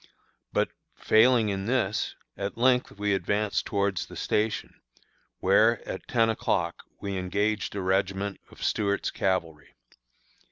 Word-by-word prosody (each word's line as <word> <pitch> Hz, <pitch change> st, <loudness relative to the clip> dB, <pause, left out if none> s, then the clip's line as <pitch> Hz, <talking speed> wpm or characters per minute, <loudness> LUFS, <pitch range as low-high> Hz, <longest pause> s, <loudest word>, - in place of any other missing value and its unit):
But, -, -, +1 dB, 0.3 s
failing 115 Hz, 0 st, +4 dB
in 95 Hz, -1 st, -2 dB
this, 115 Hz, -5 st, 0 dB, 0.2 s
at 100 Hz, +2 st, -4 dB
length 125 Hz, +1 st, +3 dB
we 105 Hz, 0 st, +1 dB
advanced 100 Hz, +1 st, 0 dB
towards 100 Hz, -2 st, 0 dB
the -, -, -11 dB
station, 105 Hz, +1 st, -1 dB, 0.6 s
where, 110 Hz, +4 st, +3 dB
at 95 Hz, -, -6 dB
ten 115 Hz, -2 st, +3 dB
o'clock, 110 Hz, -, -1 dB, 0.2 s
we 100 Hz, -1 st, -3 dB
engaged 100 Hz, +4 st, -1 dB
a 100 Hz, -, -2 dB
regiment 95 Hz, +1 st, 0 dB
of -, -, -11 dB
Stuart's 100 Hz, -1 st, 0 dB
cavalry. 85 Hz, -6 st, -2 dB
100 Hz, 125 wpm, -27 LUFS, 95-110 Hz, 0.6 s, failing